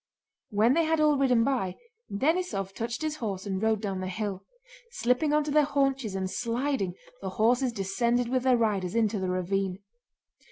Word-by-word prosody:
When 220 +3 +3
they 330 +2 +3
had 320 0 +1
all 300 -1 +4
ridden 255 -4 +3
by, 230 -9 0 0.4
Denísov 205 - 0
touched 230 +6 -4
his 310 -1 -2
horse 200 -7 -4
and 190 -1 -2
rode 220 -1 +1
down 195 -2 -2
the 185 - -3
hill. 195 0 -4 0.5
Slipping 250 +6 +1
onto 300 0 +1
their 300 +1 +5
haunches 275 -7 0
and 190 -1 -1
sliding, 235 -3 -1 0.3
the 190 - -3
horses 240 +6 +2
descended 235 +4 0
with 255 +1 +1
their 255 -1 +4
riders 205 -4 0
into 220 -2 +1
the 185 -1 -2
ravine. 185 +1 -1
230 Hz, 170 wpm, -28 LUFS, 195-270 Hz, 0.5 s, their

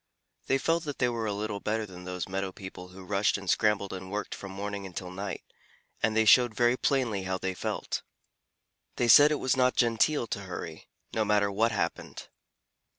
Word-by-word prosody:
They 135 - +3
felt 165 +4 0
that 145 -2 -5
they 125 - +2
were 115 -2 -2
a - - -1
little 105 0 -3
better 110 +2 -1
than 90 -2 -11
those 90 -1 -4
meadow 95 0 -3
people 95 -1 -9
who 95 +1 -12
rushed 105 +3 +1
and 100 -1 -10
scrambled 100 +1 +1
and 95 0 -7
worked 105 +2 -4
from 95 - -8
morning 100 +1 -5
until 90 0 -7
night, 95 +2 -5 0.6
and 110 0 +1
they 110 - +4
showed 120 0 +6
very 120 +1 +3
plainly 125 -7 0
how 95 0 -1
they 95 0 -3
felt. 90 - -3 0.9
They 120 - +1
said 145 +6 +9
it - - +2
was 130 -2 0
not 125 -1 +3
genteel 120 +4 +2
to 100 - -4
hurry, 90 -4 -7 0.3
no 110 - +1
matter 105 -1 +2
what 115 +4 +2
happened. 100 - -4
105 Hz, 195 wpm, -29 LUFS, 95-120 Hz, 0.9 s, said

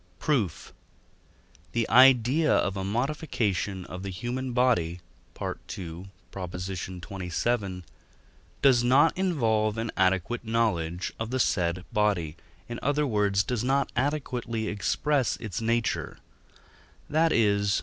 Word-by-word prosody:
Proof. 120 - -1 1.0
The 115 -1 0
idea 130 +4 +5
of 100 - +2
a 95 - -3
modification 105 - -1
of 90 - -7
the 100 - -5
human 125 +7 -4
body 90 -9 +1 0.4
(II. 90 +1 -6 0.4
xxvii.) 95 +2 -3 0.8
does 130 -4 +5
not 135 +6 +4
involve 115 - +1
an 115 0 -2
adequate 95 +5 +1
knowledge 95 -7 -1
of 115 0 -3
the 130 +1 -1
said 90 -5 0
body, 100 -8 +1 0.3
in 120 0 -5
other 145 +2 +1
words, 105 -5 +2
does 120 +1 -2
not 135 +2 +1
adequately 125 -5 -2
express 135 +6 0
its 105 -2 -5
nature; 115 0 -1 0.9
that 160 +2 +2
is 100 -3 +2
(II. - - 0
110 Hz, 115 wpm, -27 LUFS, 95-125 Hz, 1.0 s, idea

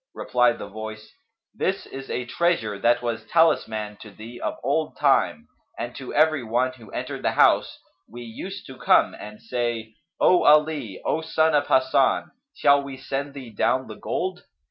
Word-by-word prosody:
Replied 125 -1 +2
the - - -7
Voice, 110 +1 -8 0.4
"This 195 -2 -2
is 135 0 -9
a 125 - -3
treasure 120 - 0
that 120 +1 +2
was 115 -2 -2
talisman'd 110 -11 +1
to 110 - -11
thee 115 +4 -11
of - - -3
old - - -1
time, - - +2 0.3
and 120 +1 -5
to 130 -2 -7
every 155 -3 +3
one 120 +3 0
who 120 -4 -15
entered - - -5
the - - 0
house, - - +3 0.3
we 120 +2 -9
used 185 - -8
to 130 - -11
come - - +4
and 105 0 -10
say: 115 -2 -3 0.3
'O 180 - +5
Ali, 150 -9 +3
O 160 - 0
son 160 0 +1
of 145 - +2
Hasan, 130 +1 +2 0.2
shall 140 0 +4
we 140 -1 -8
send 140 +2 -4
thee 130 -4 -9
down 130 +4 +1
the - - -9
gold?' 185 0 -3
130 Hz, 170 wpm, -24 LUFS, 115-150 Hz, 0.4 s, O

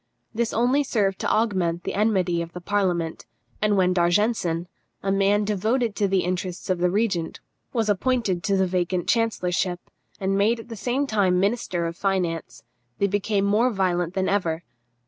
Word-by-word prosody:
This 230 0 0
only 250 +5 +2
served 200 -7 0
to - - -1
augment 185 -6 +1
the - - -3
enmity 190 -5 +1
of 170 0 -7
the 180 - -6
parliament, 175 -4 -1 0.3
and 210 -1 +2
when 185 -1 +3
D'Argenson, 175 -1 +1 0.4
a 195 - 0
man 200 +1 +2
devoted 215 +3 0
to 205 - +1
the 190 -1 +2
interests 180 0 -3
of 180 - 0
the 180 0 +2
regent, 190 -4 -1 0.3
was 225 -3 0
appointed 205 -3 +1
to 200 -2 +2
the 190 - +3
vacant 180 -1 -1
chancellorship, 185 -6 0 0.4
and 195 0 0
made 215 +4 +2
at 225 - -11
the 230 - -6
same 250 +6 -1
time 200 -7 +2
minister 195 -4 0
of 165 0 -3
finance, 180 -4 -2 0.3
they 200 - +2
became 200 0 0
more 215 +5 +3
violent 180 -5 0
than 190 -1 0
ever. 170 -4 0
195 Hz, 170 wpm, -24 LUFS, 180-215 Hz, 0.4 s, when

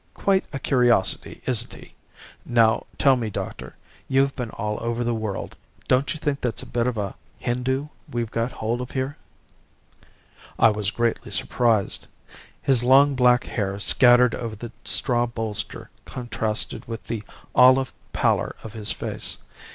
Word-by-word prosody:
Quite 195 -1 +2
a - - -3
curiosity, 120 -7 +1
isn't 120 -3 -1
he? - - -14 0.5
Now 115 -2 +3
tell 135 -2 +5
me, 115 -3 -2
doctor - - -6 0.3
you've 135 +1 +2
been 125 -4 -4
all 105 0 -3
over 115 +1 -1
the 120 0 0
world 110 -3 -4 0.3
don't 130 +2 +2
you 155 - -4
think 145 -2 -1
that's 120 -2 -2
a - - -8
bit 120 0 -1
of 125 -3 -1
a 100 -2 -2 0.2
Hindoo 130 +4 -1 0.2
we've 115 -2 -2
got 115 +2 -1
hold 115 +3 -2
of 125 - -5
here.' 130 +2 -3 1.4
"I 115 - +6
was 105 -2 -1
greatly 115 0 -1
surprised. 110 +1 +1 0.6
His 130 -4 +3
long 135 +3 +6
black 125 -2 +4
hair 100 -3 -2
scattered 125 +2 +5
over 115 -3 -4
the 115 +2 -8
straw 120 -2 +1
bolster 115 -3 -4
contrasted 115 -4 -3
with 115 -1 -6
the 115 -3 -3 0.3
olive 130 +1 +6 0.2
pallor - - +1
of 110 - -8
his 110 -2 -2
face. - - -2
120 Hz, 150 wpm, -24 LUFS, 110-130 Hz, 1.4 s, I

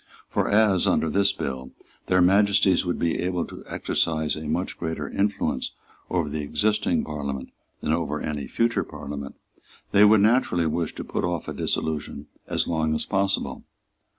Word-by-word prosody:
For - - +1
as, 105 -3 +4
under 80 - +2
this 100 +3 +4
bill, 65 -1 -5 0.3
Their 90 0 +4
Majesties 100 0 +4
would 90 - 0
be 85 -1 0
able 90 -1 -1
to - - -10
exercise 80 -2 0
a 80 - -6
much 85 +5 -2
greater 80 -3 -3
influence 100 -9 -1 0.4
over 85 -4 0
the 75 +1 -3
existing 105 +8 +1
Parliament 70 -3 -5 0.3
than 75 - 0
over 75 -2 -1
any 75 -3 -3
future 115 - +1
Parliament, 70 -2 -7 0.6
they 100 - +6
would 105 0 +7
naturally 105 -6 +3
wish 80 +1 -1
to - - -5
put - - -3
off 90 -2 -2
a - - -3
dissolution 75 -2 -2 0.2
as - - 0
long 80 -2 0
as - - -1
possible. 100 0 0
85 Hz, 160 wpm, -25 LUFS, 75-100 Hz, 0.6 s, would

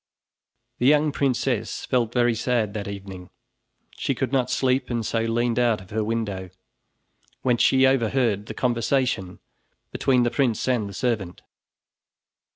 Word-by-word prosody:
The 125 - +3
young 150 +1 +4
princess 130 -5 -1
felt 120 -4 0
very 120 -1 +2
sad 115 -2 0
that 105 -2 -4
evening. 95 -2 -8 0.6
She 135 - -2
could 130 0 -2
not 130 -2 +1
sleep 130 0 +1
and 120 -2 -2
so 115 - 0
leaned 115 +1 0
out 120 -3 +2
of 95 - -15
her 110 +1 -1
window, 105 -4 -3 0.9
whence 125 -2 +2
she 130 0 +5
overheard 115 -5 +1
the - - -7
conversation 120 -5 0 0.5
between 125 -2 +2
the 120 - +1
prince 125 -4 0
and 120 -6 0
the - - -9
servant. 110 -8 -2
120 Hz, 145 wpm, -24 LUFS, 105-130 Hz, 0.9 s, she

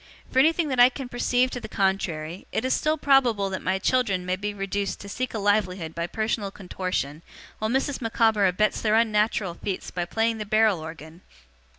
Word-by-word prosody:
For 260 - +2
anything 320 +2 +3
that 260 -2 -1
I 245 +1 +9
can 260 -1 -7
perceive 245 +1 +1
to 245 - -4
the 220 - -7
contrary, 185 -5 -2
it 220 - -1
is 260 - +2
still 310 +1 +1
probable 245 -9 +3
that 190 - -3
my 190 +1 0
children 195 -4 +1
may 180 0 0
be 205 +2 -3
reduced 200 0 -3
to 200 - -9
seek 255 +5 -3
a - - 0
livelihood 195 -5 0
by 170 0 -3
personal 215 0 -2
contortion, 180 -6 -4 0.4
while 215 - -1
Mrs. 265 +2 -1
Micawber 225 -3 +2
abets 200 +4 +1
their 215 -1 +2
unnatural 215 -4 +1
feats 190 +2 -5
by 175 -1 -2
playing 225 +4 0
the 215 - -4
barrel 215 -3 +3
organ. 160 +1 -10
210 Hz, 195 wpm, -25 LUFS, 185-235 Hz, 0.4 s, I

